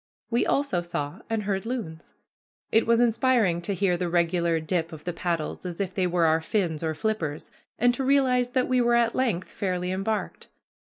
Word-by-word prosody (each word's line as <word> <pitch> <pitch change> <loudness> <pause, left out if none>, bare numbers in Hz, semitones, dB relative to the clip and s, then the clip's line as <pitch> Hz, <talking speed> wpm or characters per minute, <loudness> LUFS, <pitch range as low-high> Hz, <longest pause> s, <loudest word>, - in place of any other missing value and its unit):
We 235 - +2
also 275 -11 +1
saw 145 -4 -4
and 225 -2 -1
heard 195 -1 -1
loons. 220 -10 -6 0.6
It 225 - +3
was 230 0 +4
inspiriting 235 -6 +2
to 195 +3 -2
hear 180 -2 +1
the 175 -1 -2
regular 170 -1 +1
dip 165 +1 -2
of 155 -2 -10
the 175 - -3
paddles, 170 -2 -3
as 175 -2 -6
if 190 -2 -2
they 185 -1 +1
were 175 -1 +2
our 160 0 +3
fins 165 -3 -1
or 160 -1 -2
flippers, 160 -6 -3 0.3
and 245 +1 +3
to 265 - -3
realize 255 -2 +2
that 255 -1 +2
we 255 -1 +2
were 240 0 +3
at 235 -1 +3
length 225 -9 -1
fairly 180 -2 -2
embarked. 195 +3 -3
185 Hz, 195 wpm, -26 LUFS, 170-235 Hz, 0.6 s, was